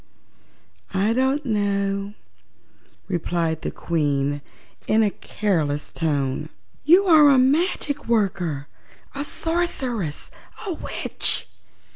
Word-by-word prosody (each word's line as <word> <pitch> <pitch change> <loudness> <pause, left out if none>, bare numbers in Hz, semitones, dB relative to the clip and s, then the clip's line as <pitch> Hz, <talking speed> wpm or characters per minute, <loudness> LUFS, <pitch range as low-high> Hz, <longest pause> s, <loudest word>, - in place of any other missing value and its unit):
"I 205 +4 +2
don't 265 +4 +1
know," 200 -2 -1 0.9
replied 170 -3 -1
the - - -2
Queen 145 -3 -1 0.5
in 220 +1 +4
a 205 - +2
careless 155 -11 -2
tone. 145 -2 -1 0.3
"You 355 +6 +6
are 310 -5 +7
a 275 - +6
magic 290 +2 +1
worker, 180 -10 0 0.5
a 280 - -3
sorceress, 270 - -2 0.3
a 380 - -2
witch!" - - -1
205 Hz, 95 wpm, -23 LUFS, -, 0.9 s, are